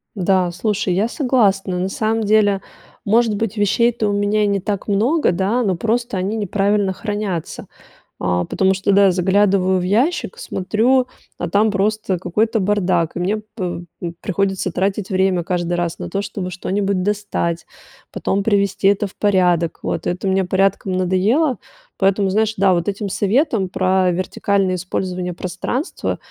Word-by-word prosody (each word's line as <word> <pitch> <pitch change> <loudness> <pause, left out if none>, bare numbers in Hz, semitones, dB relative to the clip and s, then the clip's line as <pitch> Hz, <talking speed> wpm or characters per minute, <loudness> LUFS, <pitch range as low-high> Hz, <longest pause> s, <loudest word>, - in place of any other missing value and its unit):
Да, 185 -2 +1
слушай, 190 0 -1
я 200 +5 +1
согласна. 200 - +1
На 185 - -1
самом 220 +2 -1
деле, 205 -2 +3 0.4
может 220 +1 +2
быть, 220 0 -3
вещей-то 220 +2 +2
у - - 0
меня 205 +1 +1
и - - +2
не 200 -1 +1
так 200 +2 -3
много, 230 - +2
да, 195 +8 0
но 195 -4 +1
просто 230 +2 -1
они 195 +4 -1
неправильно 200 -1 +1
хранятся, 205 -5 -4 0.5
а. 90 -1 0
Потому 190 0 +1
что, 195 +2 0
да, 195 -1 +5
заглядываю 190 0 +2
в - - -3
ящик, 265 - 0
смотрю, 245 - +1 0.3
а - - -3
там 210 +2 +2
просто 205 -1 0
какой-то 215 +6 0
бардак. 185 -4 +1
И - - -3
мне, 195 +5 0
п 190 -5 -6 0.2
м 170 -1 -4
приходится 195 -2 -1
тратить 195 +3 -1
время 185 -2 +1
каждый 175 0 -2
раз 175 -1 -2
на - - -5
то, 200 0 -2
чтобы 185 -3 -5
что-нибудь 190 +1 -1
достать, 200 -5 -2 0.4
потом 200 +1 -1
привести 200 -2 +1
это 205 +1 +3
в 195 - -9
порядок, 180 -5 +1
вот. - - -2
Это 180 +2 -2
мне 190 0 +2
порядком 195 +1 0
надоело. 200 - +1 0.4
Поэтому, 195 0 +2
знаешь, 220 +1 +1
да, 190 -1 +4
вот 170 +3 0
этим 200 0 -4
советом 215 - +1
про 185 0 +2
вертикальное 185 +1 0
использование 180 0 -3
пространства, 190 - -3
195 Hz, 155 wpm, -19 LUFS, 185-210 Hz, 0.5 s, да